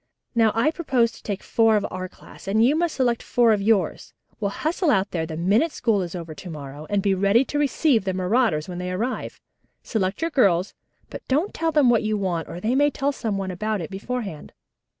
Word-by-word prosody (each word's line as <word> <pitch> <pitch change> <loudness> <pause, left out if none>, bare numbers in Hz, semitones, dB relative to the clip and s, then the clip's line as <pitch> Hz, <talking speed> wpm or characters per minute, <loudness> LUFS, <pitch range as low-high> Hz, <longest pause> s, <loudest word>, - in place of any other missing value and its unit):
Now 225 -3 +4
I 235 +7 +3
propose 265 -9 +1
to - - -15
take 200 -2 -4
four 225 -1 +3
of 205 - +1
our 185 0 -5
class, - - -15
and 220 +4 +3
you 280 +5 +3
must 335 0 0
select 240 -3 +1
four 235 -2 +3
of 205 - 0
yours. 205 -2 0 0.3
We'll 205 -3 0
hustle 320 - -1
out 195 -6 +2
there 160 -2 -2
the 155 - -6
minute 205 - +2
school 225 -8 +1
is 175 -1 -5
over 165 -2 -6
to 180 +4 -10
morrow, 145 -1 -8
and 205 -1 0
be 200 -2 +3
ready 200 +7 +3
to 290 - -2
receive 285 -4 +2
the 190 -1 -1
marauders 185 -4 +1
when 180 -1 -6
they 180 0 -3
arrive. 225 +8 -3 0.4
Select 195 +4 -2
your 330 - 0
girls, 195 - +2 0.4
but - - -7
don't 305 +9 0
tell 325 0 0
them 295 -6 +4
what 230 - +3
you 215 0 -1
want 180 -5 -2
or 170 - -6
they 220 +6 0
may 290 +2 +4
tell 280 0 -1
some 220 -7 -3
one 190 -1 -3
about 215 +3 -2
it 165 0 -6
beforehand." 195 -4 -5
215 Hz, 225 wpm, -23 LUFS, 185-255 Hz, 0.4 s, Now